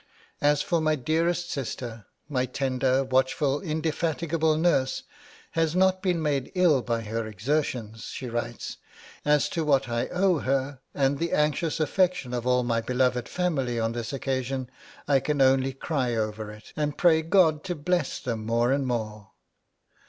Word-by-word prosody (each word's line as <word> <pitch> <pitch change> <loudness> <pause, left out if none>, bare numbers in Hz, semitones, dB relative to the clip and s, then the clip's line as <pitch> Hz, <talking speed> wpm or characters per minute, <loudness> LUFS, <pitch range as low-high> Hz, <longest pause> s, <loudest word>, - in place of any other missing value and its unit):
'As 145 0 +3
for 170 -2 +1
my 155 0 +2
dearest 165 +5 0
sister, 120 -5 -5 0.2
my 130 -4 0
tender, 130 0 +1
watchful, 130 +2 +1
indefatigable 160 -1 0
nurse 155 -6 +1 0.5
has 165 -1 0
not 185 0 +3
been 180 -4 +1
made 145 -4 -1
ill 170 -7 +4
by 115 -1 -1
her 110 +1 -3
exertions,' 115 0 -2
she 130 - -6
writes. 120 0 -4 0.5
'As 150 -1 +3
to 165 - -1
what 140 -3 +2
I 120 0 -1
owe 180 -2 +2
her, 135 0 -1 0.2
and 140 0 +1
the 170 0 -1
anxious 150 +2 +1
affection 175 -5 +1
of 120 0 -2
all 125 0 +3
my 115 -1 0
beloved 125 0 0
family 135 -10 -1
on 115 0 0
this 115 -1 -4
occasion, 130 -1 -2 0.4
I 140 -2 +4
can 150 +2 -1
only 135 0 +4
cry 130 -3 -1
over 110 -1 -2
it, 105 0 -12
and 150 -1 -2
pray 165 -3 +5
God 160 -2 +3
to 180 -2 -2
bless 175 +4 -1
them 115 -5 -3
more 115 +2 +1
and 135 -1 +1
more.' 110 -4 -3
135 Hz, 160 wpm, -26 LUFS, 120-160 Hz, 0.5 s, pray